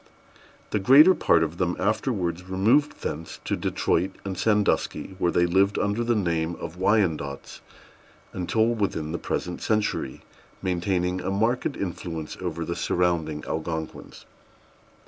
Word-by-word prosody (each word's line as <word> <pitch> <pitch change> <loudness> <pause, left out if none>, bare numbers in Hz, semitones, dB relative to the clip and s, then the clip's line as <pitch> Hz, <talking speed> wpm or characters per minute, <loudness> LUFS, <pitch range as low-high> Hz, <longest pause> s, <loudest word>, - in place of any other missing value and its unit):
The 105 - +1
greater 140 - +8
part 85 - +3
of 80 +2 -4
them 90 -1 +1
afterwards 95 -5 -1
removed 110 +11 +2
thence 80 +2 -5
to - - 0
Detroit 90 +3 0 0.2
and 95 -1 -3
Sandusky, 105 -1 0
where 85 - +2
they 85 - +3
lived 95 +3 +2
under 100 +3 0
the 120 0 +1
name 85 -4 0
of 80 - -7
Wyandots 85 -9 0 0.7
until 100 +5 +1
within 100 -9 -1
the 85 - -3
present 90 +2 -3
century, 105 -11 -1 0.4
maintaining 90 0 -1
a 95 - -3
marked 115 +8 0
influence 85 -4 -5
over 85 -2 -3
the 85 - -3
surrounding 85 -4 0
Algonquins. 80 0 -5
90 Hz, 130 wpm, -25 LUFS, 85-105 Hz, 0.7 s, greater